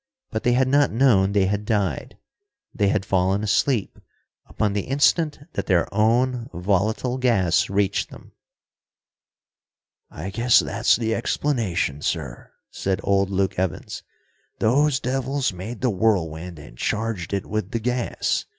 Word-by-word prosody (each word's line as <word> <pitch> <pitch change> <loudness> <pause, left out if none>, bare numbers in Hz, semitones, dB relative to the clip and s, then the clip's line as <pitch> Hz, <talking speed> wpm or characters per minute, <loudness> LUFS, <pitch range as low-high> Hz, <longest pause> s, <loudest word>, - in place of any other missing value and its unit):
But 110 -2 -2
they 120 - +2
had 130 +1 +3
not 145 +2 +3
known 110 -6 +3
they 100 -2 +2
had 100 +2 -1
died. 100 - -2 0.6
They 100 - +1
had 100 -1 0
fallen 95 +2 +1
asleep 110 +1 0 0.5
upon 105 -2 -1
the 100 - -2
instant 145 +3 +2 0.2
that - - -3
their 90 -4 +2
own 120 +3 +1
volatile 105 +7 0
gas 100 -9 +2
reached 100 0 0
them. - - -14 1.8
"I 90 +6 -7
guess 115 +4 +4
that's - - +2
the 115 0 -1
explanation, 110 - -1
sir," 75 -7 -4 0.2
said 95 -1 -2
old 100 -1 +2
Luke 95 -1 -1
Evans. 95 -2 -3 0.6
"Those 135 +4 +2
devils 130 -1 -1
made 105 +6 -7
the 125 -3 +2
whirlwind 90 -5 -1
and 70 -4 -13
charged 110 -5 -2
it 100 -2 -2
with 110 -2 -3
the 115 - -2
gas. 125 +1 -1
105 Hz, 140 wpm, -23 LUFS, 95-125 Hz, 1.8 s, guess